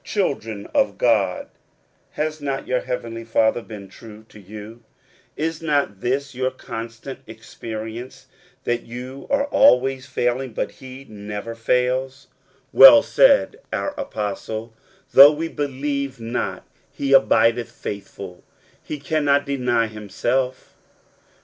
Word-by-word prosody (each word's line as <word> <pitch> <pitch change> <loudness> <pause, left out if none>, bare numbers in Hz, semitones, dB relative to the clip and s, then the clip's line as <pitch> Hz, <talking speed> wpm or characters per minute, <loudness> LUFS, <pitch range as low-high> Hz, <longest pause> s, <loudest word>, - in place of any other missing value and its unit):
Children 115 - -2
of - - +1
God - - +1 0.7
has 155 0 -3
not 135 -1 -3
your 130 0 +1
heavenly 115 -2 -5
Father 115 +1 +1
been 105 -3 -10
true 110 +2 -13
to 110 - -14
you? 105 +3 -11 0.6
Is 160 +1 -2
not 145 -11 0
this 135 +2 -1
your 130 +1 -1
constant 115 +1 -8
ex 110 +2 -13
perience, 115 +2 -7 0.4
that 120 0 -1
you 125 +3 -9
are 280 0 +2
always 130 - +3
failing, 125 -1 -1
but - - -3
he 130 +1 -12
never 105 +1 -7
fails? 125 +3 -1 0.5
Well - - +10
said - - +4
our 290 - -2
apostle, 110 - -5 0.2
" - - -34
Though 140 +3 +10
we 160 +2 -3
believe 140 -2 -3
not, 115 +2 -4 0.3
he 140 -1 -1
abideth 115 -1 +4
faithful: 100 -2 -8 0.4
he 150 - -6
cannot 145 -1 +1
deny 125 -5 +1
himself." 115 +5 -3
125 Hz, 125 wpm, -22 LUFS, 115-140 Hz, 0.7 s, Well